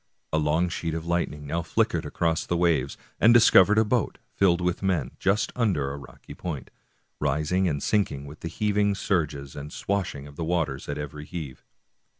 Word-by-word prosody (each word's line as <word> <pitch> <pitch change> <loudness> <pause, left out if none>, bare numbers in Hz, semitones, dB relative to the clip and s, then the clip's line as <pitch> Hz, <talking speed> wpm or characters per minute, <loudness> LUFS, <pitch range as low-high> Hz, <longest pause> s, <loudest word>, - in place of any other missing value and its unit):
A 80 - +3
long 80 +3 +2
sheet 85 -2 -3
of 80 0 -4
lightning 85 -4 -1
now 85 +4 -1
flickered - - 0
across 80 -1 0
the 85 - -1
waves, 80 -6 +1 0.2
and 110 - +6
discovered 105 -3 +7
a 110 - +5
boat, 115 +1 0 0.2
filled 90 -3 +3
with 90 0 -1
men, 90 -10 0
just 100 +3 +1
under 90 - +1
a 70 - -5
rocky 70 - -12
point, 80 -7 -6 0.5
rising 75 +6 +1
and 70 -4 -1
sinking 95 -10 0
with 75 +2 -11
the - - -5
heaving 105 +1 +1
surges, 75 -9 -2
and 75 +1 -7
swash 100 +1 -2
ing 70 0 -8
the 80 - -5
waters 80 -5 -1
at 70 - -2
every 75 0 -6
heave. 75 -6 -7
85 Hz, 180 wpm, -26 LUFS, 75-95 Hz, 0.5 s, discovered